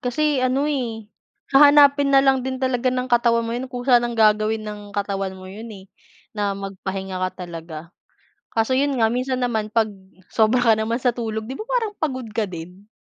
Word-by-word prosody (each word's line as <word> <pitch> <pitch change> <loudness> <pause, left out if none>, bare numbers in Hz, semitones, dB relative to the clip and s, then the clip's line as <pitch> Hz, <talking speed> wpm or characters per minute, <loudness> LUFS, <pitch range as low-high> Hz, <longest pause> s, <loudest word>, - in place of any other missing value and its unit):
Kasi 295 +3 0
ano, 255 +2 +1
eh, 225 -6 -4 0.4
hahanapin 285 0 +6
na 270 - +7
lang 265 -1 +2
din 260 0 -4
talaga 255 -1 0
ng 255 0 -3
katawan 235 -1 +3
mo 230 - -4
yun. 260 - -4
Kusa 245 -1 +2
nang 240 0 -3
gagawin 215 0 +2
ng 210 -1 -7
katawan 195 -1 -2
mo 185 0 -11
yun, 215 +4 -9
eh, 190 0 -14 0.4
na 205 -2 -2
mag-pahinga 195 -1 -5
ka 185 0 -3
talaga. 165 -1 -9 0.6
Kaso 225 +3 0
yun 280 +1 +1
nga, 225 - +4
minsan 255 +1 -1
naman 220 -4 -1
pag-sobra 215 +2 0
ka 225 -2 +6
naman 220 +2 -1
sa 250 -1 +1
tulog, 220 -2 -4
'di 260 +4 -6
ba, 435 - -4
parang 475 -4 0
pagod 260 -5 -2
ka 220 -2 -1
din? 180 +3 -10
230 Hz, 185 wpm, -22 LUFS, 200-260 Hz, 0.6 s, na